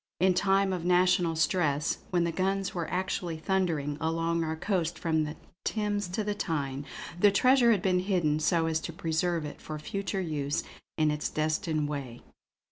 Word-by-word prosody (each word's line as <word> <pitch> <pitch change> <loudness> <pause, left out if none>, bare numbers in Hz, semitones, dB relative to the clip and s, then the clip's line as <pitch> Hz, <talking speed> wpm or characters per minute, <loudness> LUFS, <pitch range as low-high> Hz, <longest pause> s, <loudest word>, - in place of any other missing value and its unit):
In 185 +1 +4
time 195 0 +2
of 180 -2 -3
national 180 -1 +3
stress, 160 -3 +1
when 175 -2 +2
the 170 - 0
guns 195 +2 -1
were 170 -3 -3
actually 180 -2 -2
thundering 160 -5 -1
along 165 +1 0
our 160 0 -2
coast 175 -1 -1
from 160 -2 +1
the 150 +1 -5 0.3
Thames 205 -2 -1
to 185 +5 -2
the 210 0 -1
Tyne, 145 -8 -3 0.3
the 205 +2 +6
treasure 250 +4 +5
had 205 -5 +3
been 185 -2 +3
hidden 175 -6 +1
so 165 +1 +2
as 160 -1 +1
to 165 - -6
preserve 165 -1 -1
it 150 - -8
for 155 - -6
future 195 +5 -3
use 150 -4 -1 0.3
in 155 -1 +3
its 150 0 -2
destined 155 0 0
way. 135 -5 -6
170 Hz, 175 wpm, -29 LUFS, 155-190 Hz, 0.3 s, the